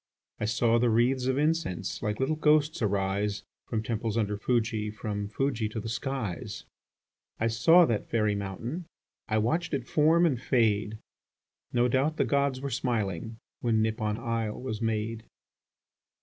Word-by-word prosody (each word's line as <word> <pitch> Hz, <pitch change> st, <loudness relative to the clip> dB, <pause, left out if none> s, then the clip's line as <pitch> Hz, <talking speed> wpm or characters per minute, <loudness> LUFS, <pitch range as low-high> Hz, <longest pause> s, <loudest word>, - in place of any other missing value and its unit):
I -, -, -1 dB
saw 115 Hz, +1 st, +2 dB
the 120 Hz, 0 st, +3 dB
wreathes 125 Hz, +3 st, +2 dB
of 130 Hz, 0 st, +1 dB
incense 150 Hz, -, -1 dB
Like 105 Hz, -2 st, -2 dB
little 135 Hz, +4 st, +1 dB
ghosts 155 Hz, -1 st, +3 dB
arise, 100 Hz, 0 st, 0 dB, 0.2 s
From 110 Hz, -2 st, -2 dB
temples 115 Hz, 0 st, -2 dB
under 105 Hz, -2 st, 0 dB
Fuji, 110 Hz, -1 st, 0 dB
From 105 Hz, -1 st, -4 dB
Fuji 115 Hz, 0 st, -1 dB
to 110 Hz, -, -4 dB
the 110 Hz, -, -5 dB
skies. 115 Hz, -, -4 dB, 0.8 s
I 115 Hz, -, +1 dB
saw 140 Hz, +11 st, +6 dB
that 115 Hz, -8 st, -2 dB
fairy 105 Hz, -2 st, +2 dB
mountain.... 105 Hz, -, -4 dB, 0.4 s
I 110 Hz, -, +1 dB
watched 150 Hz, +9 st, 0 dB
it 125 Hz, -3 st, -4 dB
form 160 Hz, +3 st, +4 dB
and 130 Hz, -8 st, +1 dB
fade. 110 Hz, -4 st, +1 dB, 0.7 s
No 120 Hz, 0 st, +3 dB
doubt 135 Hz, +6 st, +1 dB
the -, -, +2 dB
gods 140 Hz, -2 st, +1 dB
were 140 Hz, 0 st, -3 dB
smiling, 110 Hz, -4 st, -2 dB, 0.2 s
When 110 Hz, -2 st, +2 dB
Nippon 110 Hz, -1 st, -1 dB
isle 115 Hz, -2 st, -2 dB
was 120 Hz, -4 st, -4 dB
made. 110 Hz, 0 st, -1 dB
115 Hz, 150 wpm, -28 LUFS, 105-130 Hz, 0.8 s, saw